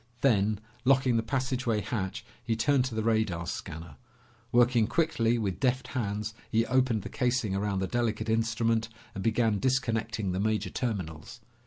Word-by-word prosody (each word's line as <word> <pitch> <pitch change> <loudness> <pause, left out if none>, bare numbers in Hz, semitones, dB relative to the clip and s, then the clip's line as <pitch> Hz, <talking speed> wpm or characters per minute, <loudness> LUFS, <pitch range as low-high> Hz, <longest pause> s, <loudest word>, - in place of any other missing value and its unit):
Then, 105 -5 +3 0.2
locking 130 -1 +4
the - - +2
passageway 125 -2 -1
hatch, 95 -4 -3 0.2
he 115 - 0
turned 130 +3 +2
to 125 -4 -4
the 110 - -1
radar 110 -7 +1
scanner. 80 -3 -6 0.5
Working 120 -2 +4
quickly 120 -5 +1
with 100 -5 -2
deft 130 -1 0
hands, 105 -3 -2 0.2
he 115 +1 +3
opened 125 -5 +2
the - - -5
casing 125 -5 0
around 100 -1 -1
the 95 - 0
delicate 115 +1 -1
instrument 115 0 +1 0.2
and 95 - -5
began 110 -1 +2
disconnecting 115 -6 0
the 90 - -2
major 110 +1 0
terminals. 95 - -4
115 Hz, 155 wpm, -29 LUFS, 105-125 Hz, 0.5 s, locking